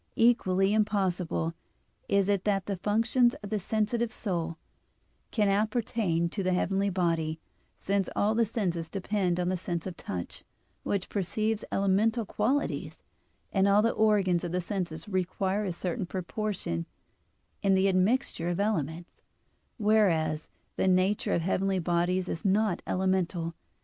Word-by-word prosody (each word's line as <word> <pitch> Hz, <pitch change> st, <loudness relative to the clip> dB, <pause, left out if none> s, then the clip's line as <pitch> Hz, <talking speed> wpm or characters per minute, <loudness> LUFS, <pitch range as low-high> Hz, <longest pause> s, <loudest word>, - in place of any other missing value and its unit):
Equally 195 Hz, -4 st, +3 dB
impossible 185 Hz, -6 st, 0 dB, 0.6 s
is 200 Hz, -1 st, +3 dB
it 200 Hz, -2 st, +1 dB
that 195 Hz, -2 st, +1 dB
the 200 Hz, -2 st, -3 dB
functions 225 Hz, +5 st, +2 dB
of 205 Hz, -, -7 dB
the 215 Hz, -, +1 dB
sensitive 220 Hz, +4 st, 0 dB
soul 170 Hz, -8 st, -3 dB, 0.7 s
can 210 Hz, -3 st, +1 dB
appertain 210 Hz, -4 st, +1 dB
to 200 Hz, -, -3 dB
the 185 Hz, -1 st, +1 dB
heavenly 195 Hz, +2 st, +1 dB
body, 165 Hz, -4 st, 0 dB, 0.4 s
since 195 Hz, -1 st, 0 dB
all 210 Hz, +2 st, +2 dB
the 230 Hz, +1 st, +3 dB
senses 180 Hz, -7 st, -2 dB
depend 190 Hz, -2 st, -1 dB
on 180 Hz, 0 st, 0 dB
the 185 Hz, -, +1 dB
sense 175 Hz, -2 st, -4 dB
of 185 Hz, -2 st, -5 dB
touch, 90 Hz, -, -6 dB, 0.4 s
which 200 Hz, -2 st, -2 dB
perceives 215 Hz, +3 st, -1 dB
elemental 210 Hz, +4 st, +2 dB
qualities, 255 Hz, +9 st, -1 dB, 0.5 s
and 195 Hz, 0 st, +3 dB
all 200 Hz, +1 st, +5 dB
the 230 Hz, -, +3 dB
organs 200 Hz, -5 st, +2 dB
of 175 Hz, -, -3 dB
the 180 Hz, -, 0 dB
senses 175 Hz, -3 st, -4 dB
require 190 Hz, +1 st, -1 dB
a 190 Hz, -, -1 dB
certain 175 Hz, +1 st, -3 dB
proportion 185 Hz, -, -3 dB, 0.7 s
in 195 Hz, -1 st, +3 dB
the 190 Hz, +1 st, +3 dB
admixture 185 Hz, -2 st, +1 dB
of 175 Hz, -, -2 dB
elements, 170 Hz, -5 st, -2 dB, 0.6 s
whereas 175 Hz, -9 st, +2 dB, 0.3 s
the -, -, +2 dB
nature 185 Hz, +2 st, +2 dB
of 170 Hz, -, +1 dB
the -, -, -5 dB
heavenly 190 Hz, +1 st, +1 dB
bodies 180 Hz, +1 st, +1 dB
is 165 Hz, -, -4 dB
not 210 Hz, +2 st, +2 dB
elemental. 185 Hz, -3 st, 0 dB
190 Hz, 145 wpm, -29 LUFS, 175-210 Hz, 0.7 s, all